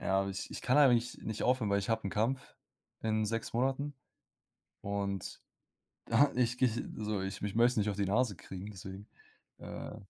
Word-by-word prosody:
ja, 95 0 +1
ich 95 +1 -4
ich - - -6
kann 130 - +3
eigentlich 125 -4 +4
nicht 110 -1 -4
aufhören, 125 -5 +2
weil 100 - +3
ich 100 - -5
habe 115 - +1
'n - - -5
Kampf 120 +5 -1 0.5
in 110 -1 +1
6 115 +2 -2
Monaten 135 +4 0 0.9
und 100 -1 -3 0.7
ja, 145 0 +5
ich 125 -1 +2
gehe 130 -1 +4 0.3
so 105 -2 -1
ich 95 +1 -4
mich 105 0 -3
möchte 120 0 +4
nicht 105 0 +2
auf 100 - -2
die 100 - +1
Nase 105 +1 +2
kriegen, 95 +4 -8
deswegen, 95 +1 -9 0.5
äh. - - -7
110 Hz, 180 wpm, -33 LUFS, 100-125 Hz, 0.9 s, ja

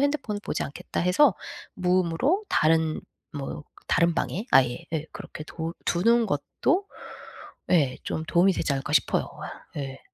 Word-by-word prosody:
핸드폰을 280 -8 0
보지 - - -2
않겠다.' 140 - -4
해서 185 - +4 0.4
무음으로 185 - +1
다른 160 0 +2 0.3
뭐 145 0 -5 0.2
다른 170 0 +3
방에 205 +7 -2
아예 125 -2 +4
예 160 0 -2
그렇게 155 - -8
도 165 +1 -5
두는 230 +7 +3
것도 280 - 0 0.9
예 145 -7 +3
좀 160 - -3
도움이 180 +4 +4
되지 150 - -1
않을까 135 +2 -3
싶어요. - - +3 0.2
아 - - -8
예. 135 -1 -5
170 Hz, 285 characters per minute, -26 LUFS, 150-205 Hz, 0.9 s, 해서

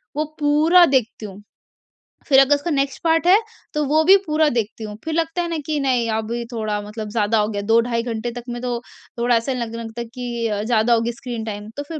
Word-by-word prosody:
वो 305 - 0
पूरा 310 +5 +5
देखती 255 -6 0
हूँ। 200 0 -10 0.9
फिर 270 -2 +6
अगर 275 +2 +5
उसका 285 +4 -4
नेक्स्ट 275 -1 -1
पार्ट 325 +1 +2
है, 380 +3 +7 0.4
तो 300 0 0
वो 310 +2 +3
भी 380 +4 +7
पूरा 310 0 +2
देखती 225 0 -2
हूँ। 210 -1 -6
फिर 320 - -3
लगता 325 +2 -1
है 345 - -2
ना 330 - -2
कि 305 -1 -1
नहीं, 250 -4 +1
अभी 225 +2 -2
थोड़ा 215 -3 -2
मतलब 210 +1 -7
ज़्यादा 220 0 +1
हो 210 - +1
गया, 205 -2 -3
2 225 +3 +3
ढाई 235 -1 -2
घंटे 235 0 -3
तक 240 0 -8
में 240 0 -5
तो 245 -1 -2 0.4
थोड़ा 240 0 +3
ऐसा 230 +4 0
लगने 230 -2 -4
लगता 225 +1 -7
है 235 - -6
कि 240 -2 -3
अ, 210 -1 -2
ज़्यादा 230 +1 +2
हो 230 - +3
गया 235 +1 -1
स्क्रीन 235 -3 -5
टाइम। 210 -1 -6
तो 285 - -3
फिर 320 -2 -5
240 Hz, 240 wpm, -21 LUFS, 225-290 Hz, 0.9 s, है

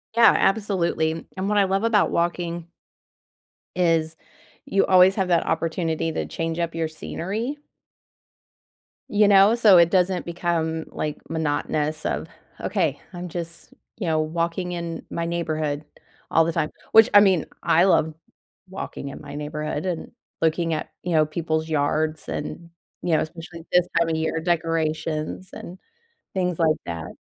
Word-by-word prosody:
Yeah, 235 0 +7
absolutely. 175 -6 0
And 190 +1 -2
what 210 - +1
I 200 - +6
love 195 +2 0
about 225 -3 +3
walking 170 0 -1 1.1
is 165 -3 +1 0.5
you 195 - +2
always 185 +1 +6
have 190 -3 0
that 170 -2 +3
opportunity 165 -1 -1
to - - -2
change 165 +1 -3
up 165 -1 -2
your 165 -1 0
scenery. 210 - -4 1.5
You 210 0 +4
know, 200 +2 +6
so 215 -6 +6
it 170 -1 +6
doesn't 180 0 +1
become, 165 -2 -1
like, 150 -1 -3
monotonous 155 -1 -1
of, - - -2 0.3
"Okay, - - -1
I'm 175 0 -6
just," 170 -1 -7 0.2
you 195 - -3
know, 160 -1 +2
"walking 170 +3 -2
in 170 -1 -5
my 170 - -3
neighborhood 155 -3 -2 0.5
all 165 0 +4
the 165 - 0
time," 155 -2 0 0.2
which, 225 0 +8
I 205 - +10
mean, 190 -5 +4 0.2
I 170 0 +4
love 160 -4 +3 0.6
walking 160 -6 -6
in - - -9
my 140 0 -9
neighborhood 150 +2 -4
and 175 -3 -3 0.3
looking 165 0 +1
at, 155 - -3
you 180 - -2
know, 155 -1 +4
people's 160 0 -2
yards 155 +1 0
and, 170 +3 -5 0.3
you 175 - 0
know, 155 - +2
especially 165 +1 -8
this 180 0 +4
time 165 -1 +2
of 160 - 0
year, 160 0 -1
decorations 160 0 -1
and 180 - -9 0.6
things 180 -3 -1
like 160 -2 +3
that. 85 -2 -6
165 Hz, 150 wpm, -24 LUFS, 160-180 Hz, 1.5 s, I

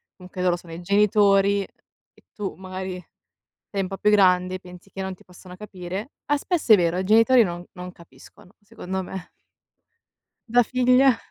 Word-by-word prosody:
comunque 180 0 -9
loro 180 -1 +2
sono 170 -1 -12
i 165 - -8
genitori 200 +1 +3
e 195 - -17
tu 205 -2 -5
magari 185 0 -7 0.7
sei 200 -1 -2
un - - -3
po' 195 0 -7
più 210 - +2
grande 185 -3 +3
e - - -4
pensi 180 +1 -14
che 195 - -8
non 190 0 -4
ti - - -21
possano 180 0 -14
capire; 195 +3 -7 0.2
ah, 290 - +2
spesso 305 -4 +1
è - - +9
vero, 175 -1 0
i 190 - -2
genitori 230 +4 +5
non 175 -2 -5
non 180 -1 -8
capiscono 170 +4 -18
secondo 190 -3 -6
me. 185 0 -8 1.2
Da 245 +2 +4
figlia. 255 +1 +3
190 Hz, 175 wpm, -23 LUFS, 180-210 Hz, 1.2 s, è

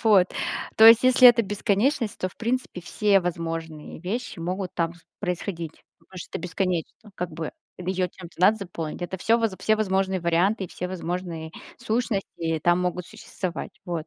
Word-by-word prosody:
Вот, 195 -5 +6 0.5
то 220 - +9
есть, 230 +1 +9
если 255 0 +8
это 235 -1 +5
бесконечность, 210 +4 0
то, 185 - -1
в - - -20
принципе, 235 -4 -2
все 200 +3 +2
возможные 165 -3 -5
вещи 215 +4 -4
могут 180 +2 -3
там 165 0 -1
с 175 - -21 0.2
происходить. 175 -3 -4 0.3
Может, 185 -2 -8
это - - -4
бесконечно, 180 +3 -3
как 180 -2 -4
бы, 160 0 -5 0.3
её 180 0 -1
чем-то 175 -2 -12
надо 205 +4 +6
заполнить. 175 -5 -6
Это 175 +2 -3
всё 225 +6 +3
воз 225 -3 +1
все 215 +2 +3
возможные 190 -3 0
варианты 180 +5 +2
и - - -8
все 180 - -5
возможные 175 -3 -4 0.3
сущности 200 -8 -1
там 175 +1 +3
могут 180 -1 -2
существовать. 190 -5 -6
Вот. 170 -3 -4
185 Hz, 165 wpm, -25 LUFS, 170-210 Hz, 0.5 s, то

